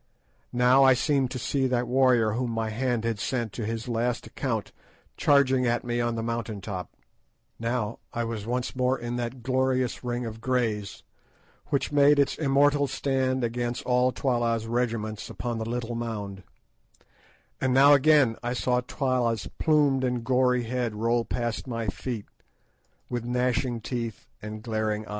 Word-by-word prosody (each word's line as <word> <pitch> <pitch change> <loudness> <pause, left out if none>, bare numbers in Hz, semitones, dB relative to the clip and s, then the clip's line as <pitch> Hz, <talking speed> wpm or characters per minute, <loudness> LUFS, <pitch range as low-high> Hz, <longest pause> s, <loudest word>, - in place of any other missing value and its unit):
Now 125 +2 +5
I 130 -1 +7
seemed 140 -1 +1
to 130 - -5
see 130 +2 0
that 125 -1 0
warrior 125 -3 +3
whom 120 +3 -1
my 115 -1 -2
hand 120 0 -1
had 115 -3 -1
sent 120 -4 -2
to 110 -1 -4
his 115 0 -4
last 120 0 -1
account - - -3 0.4
charging 130 -3 +3
at 120 0 0
me 120 0 -1
on 120 -1 0
the 115 - -3
mountain 115 -2 -3
top; 95 -2 -5 0.7
now 115 -1 -2
I 120 - -2
was 115 -2 -4
once 125 +2 -2
more 130 +1 +1
in 120 0 -4
that 120 0 -4
glorious 130 -1 0
ring 120 0 -2
of 110 0 -7
Greys, 110 -7 -1 0.6
which 145 -1 -1
made 145 0 +5
its 140 -2 +2
immortal 145 0 +3
stand 130 -2 0
against 120 +1 -2
all 125 0 +3
Twala's 120 -4 0
regiments 115 -2 -2
upon 120 -2 -4
the 110 0 -4
little 120 -1 -3
mound; 105 -5 -4 1.2
and 130 - +1
now 140 +3 +7
again 140 -4 +5
I 120 0 -2
saw 125 0 +1
Twala's 125 -4 -1
plumed 145 -4 +3
and 125 -2 -1
gory 125 0 +2
head 120 -1 -2
roll 115 +2 +1
past 120 +1 -3
my 115 -2 -3
feet 110 +2 -4 0.8
with 120 -2 -3
gnashing 125 0 0
teeth 115 -2 -4 0.2
and 105 0 -7
glaring 110 -2 -1
eye. - - -14
120 Hz, 160 wpm, -27 LUFS, 115-130 Hz, 1.2 s, I